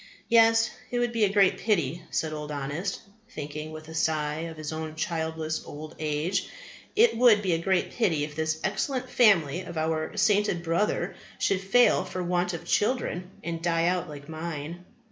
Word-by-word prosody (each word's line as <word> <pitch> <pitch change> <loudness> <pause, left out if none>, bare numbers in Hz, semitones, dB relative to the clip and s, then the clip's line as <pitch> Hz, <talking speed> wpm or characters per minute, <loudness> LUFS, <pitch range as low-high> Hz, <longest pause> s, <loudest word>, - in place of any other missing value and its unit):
Yes, 225 -1 +5 0.2
it 245 - -2
would 240 0 +1
be 230 -2 +3
a 195 - 0
great 200 -2 +4
pity, 170 - 0
said 155 -1 -1
Old 150 0 -5
Honest, 145 +7 -3 0.3
thinking 150 +2 -6
with 155 0 -9
a 160 - -9
sigh 155 -1 0
of 160 - -10
his 155 0 -5
own 155 0 -5
childless 160 -1 -2
old 155 +1 -9
age, 155 +4 -1 0.5
it 455 +3 +5
would 225 -3 +5
be 185 -3 +1
a 165 - +1
great 190 0 +1
pity 170 -11 +1
if 150 0 -5
this 160 0 -1
excellent 255 +6 -1
family 180 - +4
of 175 -3 -8
our 160 +4 -1
sainted 205 -4 +2
brother 170 +5 0 0.2
should 195 -1 +1
fail 195 +4 +4
for 185 0 -4
want 180 0 0
of 165 - -8
children, 205 -6 0
and 165 -1 -4
die 165 -1 +1
out 180 -1 0
like 145 -1 -9
mine. 160 +1 -6
170 Hz, 180 wpm, -27 LUFS, 155-200 Hz, 0.5 s, Yes